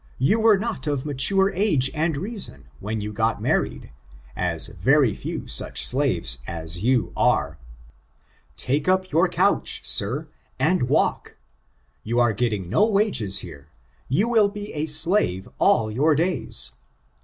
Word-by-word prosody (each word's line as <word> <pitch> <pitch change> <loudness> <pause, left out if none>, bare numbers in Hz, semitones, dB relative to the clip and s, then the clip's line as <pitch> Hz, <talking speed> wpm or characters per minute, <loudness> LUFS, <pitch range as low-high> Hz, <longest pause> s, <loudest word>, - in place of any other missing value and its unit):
You 140 - +2
were 220 -2 +5
not 210 - -4
of 145 -2 -2
mature 170 +8 +2
age 165 -9 +3
and 160 -1 -1
reason 185 - -1
when 110 +2 -4
you 105 +1 -5
got - - 0
married, - - -2 0.4
as 90 +1 -1
very 115 - +2
few - - -6
such - - -1
slaves - - +1
as 85 +1 -4
you 125 0 +1
are. 75 +1 +1 1.0
Take 140 +5 -1
up 185 0 +1
your 165 +5 +3
couch, 180 +3 +1
sir, 135 +10 0 0.3
and 150 -1 +1
walk. - - 0 0.6
You 120 +2 -1
are 120 -2 +3
getting 105 -4 -2
no 150 - +2
wages 200 - +1
here: 70 -4 -11 0.4
you 185 - +1
will 220 -4 +3
be 205 0 -8
a 155 +1 -3
slave 155 - +1
all 110 -3 +3
your 150 +7 +2
days. 150 - -1
140 Hz, 145 wpm, -23 LUFS, -, 1.0 s, were